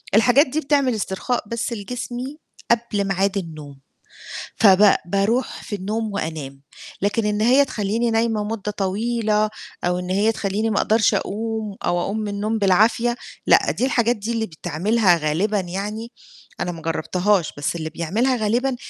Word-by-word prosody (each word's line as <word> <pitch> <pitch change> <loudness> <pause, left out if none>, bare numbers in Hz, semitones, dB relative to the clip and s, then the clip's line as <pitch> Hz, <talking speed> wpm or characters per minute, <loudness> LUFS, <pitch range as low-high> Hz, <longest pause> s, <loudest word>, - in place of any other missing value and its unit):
الحاجات 245 +7 +5
دي 285 +4 -1
بتعمل 280 -4 +1
استرخاء 215 +4 -2
بس 230 +2 -3
لجسمي 245 +5 -5 0.3
قبل 225 -4 +1
ميعاد 195 +1 +1
النوم، 155 -6 -7 0.8
فب 200 -1 +6
بارُوح 200 +7 0
في 205 - -4
النوم 215 +3 -3
وأنام، 145 -7 -5 0.4
لكن 205 +3 0
إن 210 0 0
هي 260 +5 +5
تخلّيني 230 0 -1
نايمة 225 -1 +1
مدة 210 -1 -3
طويلة 215 +2 0 0.3
أو 180 0 +1
إن 180 - -6
هي 205 +4 +2
تخلّيني 215 +1 -1
ما 205 - -1
أقدَرش 220 0 +3
أقوم 220 0 -3
أو 175 - +1
أقوم 205 +5 -2
من 210 - -3
النوم 210 +2 -2
بالعافية، 220 +5 +3 0.3
لأ - - +5
دي 255 - -1
الحاجات 240 -2 +2
دي 215 +2 -4
اللي 225 -1 -1
بتعملها 180 +3 +1
غالبًا 170 +7 0
يعني، 205 +6 -5 0.5
أنا 175 - -1
ما 165 -2 -9
جرَّبتهاش 175 +3 0
بس 145 +3 -2
اللي 160 -1 -4
بيعملها 205 +12 0
غالبًا 240 +4 0
210 Hz, 150 wpm, -22 LUFS, 190-230 Hz, 0.8 s, فب